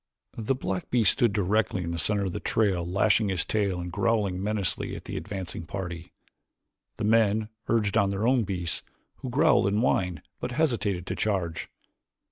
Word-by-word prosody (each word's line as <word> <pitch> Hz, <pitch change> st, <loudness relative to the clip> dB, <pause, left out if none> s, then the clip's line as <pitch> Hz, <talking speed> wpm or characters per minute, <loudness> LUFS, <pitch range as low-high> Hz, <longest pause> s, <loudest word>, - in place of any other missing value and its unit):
The 115 Hz, +4 st, 0 dB
black 95 Hz, -7 st, -3 dB
beast 115 Hz, -5 st, +5 dB
stood 120 Hz, -5 st, +2 dB
directly 100 Hz, -1 st, +1 dB
in 85 Hz, -, -3 dB
the 85 Hz, -, -3 dB
center 100 Hz, +4 st, +2 dB
of 95 Hz, -, -2 dB
the -, -, -3 dB
trail 95 Hz, -6 st, +1 dB
lashing 100 Hz, +4 st, +2 dB
his 90 Hz, -4 st, 0 dB
tail 100 Hz, -4 st, 0 dB
and 90 Hz, 0 st, -5 dB
growling 100 Hz, -1 st, 0 dB
menacingly 105 Hz, -2 st, -1 dB
at -, -, -9 dB
the -, -, -5 dB
advancing 95 Hz, -4 st, -5 dB
party. 90 Hz, -3 st, -6 dB, 0.9 s
The 110 Hz, -, -3 dB
men 110 Hz, 0 st, +3 dB, 0.2 s
urged 105 Hz, -3 st, +1 dB
on 100 Hz, -, +2 dB
their 100 Hz, +2 st, -1 dB
own 125 Hz, -1 st, +3 dB
beasts, 90 Hz, -4 st, -2 dB, 0.4 s
who 130 Hz, -, -6 dB
growled 140 Hz, -5 st, +4 dB
and 100 Hz, +1 st, +1 dB
whined 90 Hz, -, +1 dB, 0.2 s
but 125 Hz, -, -4 dB
hesitated 115 Hz, -, 0 dB
to -, -, -3 dB
charge. 95 Hz, -6 st, -1 dB
100 Hz, 175 wpm, -27 LUFS, 90-110 Hz, 0.9 s, beast